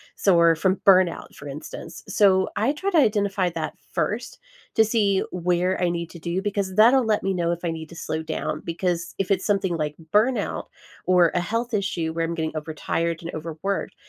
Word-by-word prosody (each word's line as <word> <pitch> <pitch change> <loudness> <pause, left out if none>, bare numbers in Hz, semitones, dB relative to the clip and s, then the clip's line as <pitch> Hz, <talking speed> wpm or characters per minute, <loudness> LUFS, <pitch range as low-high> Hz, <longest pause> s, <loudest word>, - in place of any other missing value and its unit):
So 195 -3 +3
or 170 -1 +5
from 190 +4 +2
burnout, 185 -3 +3
for 145 - -10
instance. 150 +3 -8
So, 195 -2 +3
I 220 +6 +2
try 380 +7 -2
to 350 - +2
identify 205 - +2
that 165 -2 -4 0.2
first 210 +9 -2 0.4
to 220 - +6
see 205 -3 +2
where 180 +1 0
I 180 - +2
need 170 -1 -3
to 170 - -10
do 170 +3 -2
because 200 -2 -2
that'll 240 +4 +6
let 215 -1 +1
me 195 0 0
know 170 -2 0
if 170 - -2
I 165 - 0
need 160 -1 -7
to 170 - -12
slow 160 -1 -4
down, 160 0 -3
because 170 0 -2
if 195 0 -1
it's 190 -1 +1
something 195 -4 +1
like 150 -1 -2 0.2
burnout 235 +5 +1 0.4
or 180 -2 +4
a - - +3
health 230 +7 -2
issue 175 -6 -1
where 165 0 -1
I'm 165 - -3
getting 160 -1 -3
overtired 160 +2 -2
and 170 - -6
overworked, 165 +5 -4
180 Hz, 200 wpm, -24 LUFS, 165-200 Hz, 0.4 s, to